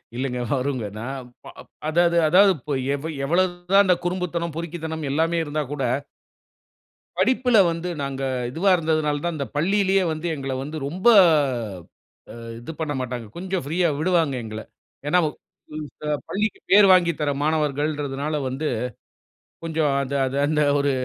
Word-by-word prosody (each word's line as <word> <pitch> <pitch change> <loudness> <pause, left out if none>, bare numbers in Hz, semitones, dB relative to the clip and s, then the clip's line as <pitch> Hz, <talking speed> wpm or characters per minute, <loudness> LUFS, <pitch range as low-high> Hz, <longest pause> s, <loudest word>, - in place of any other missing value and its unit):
இல்லைங்க. 125 -1 -2
வருங்க. 130 -3 -1
நான் 130 +1 -6 0.2
ப் - - -9
அ - - -13 0.3
அதாவது 170 +1 +3
அதாவது 195 +4 +6
இப்ப 145 +1 -4 0.2
எவ 145 - -8 0.2
எவ்வளவு 175 +4 +2 0.2
தான் 200 +1 +7
இந்த 180 - +5
குறும்புத்தனம், 175 -2 -2
பொறுக்கித்தனம் 160 -2 -4
எல்லாமே 165 +3 +1
இருந்தா 150 0 -2
கூட 135 -3 -3 1.3
படிப்புல 250 -2 +3
வந்து 165 +2 -4 0.2
நாங்க 135 0 -4 0.3
இதுவா 175 +8 +1
இருந்ததுனால 155 -3 0
தான், 170 -1 -1
இந்த 140 - -2
பள்ளியிலயே 195 +4 +2
வந்து, 155 +2 -5
எங்கள 135 -2 -4
வந்து 150 +3 -6
ரொம்ப 185 +9 -2 1.2
அ - - -10 0.3
இது 120 +7 -7
பண்ணமாட்டாங்க. 130 -6 -3
கொஞ்சம் 190 -1 -3
ஃப்ரீயா 170 +5 +1
விடுவாங்க 165 -4 +2
எங்கள. 110 0 -6 0.5
ஏன்னா 180 +4 +4
வு - - +1 0.5
இந்த 150 0 -9 0.2
பள்ளிக்கு 210 +3 -1
பேர் 200 0 +8
வாங்கித் 170 -3 +3
தர 145 -1 +1
மாணவர்கள்ன்றதனால 150 -1 -1
வந்து, 140 +4 -3 1.0
கொஞ்சம் 160 -3 0
அந்த 140 +1 -3
அது 130 +1 -3
அந்த 150 +1 +1 0.2
ஒரு 140 0 +1
155 Hz, 145 wpm, -23 LUFS, 140-175 Hz, 1.3 s, பேர்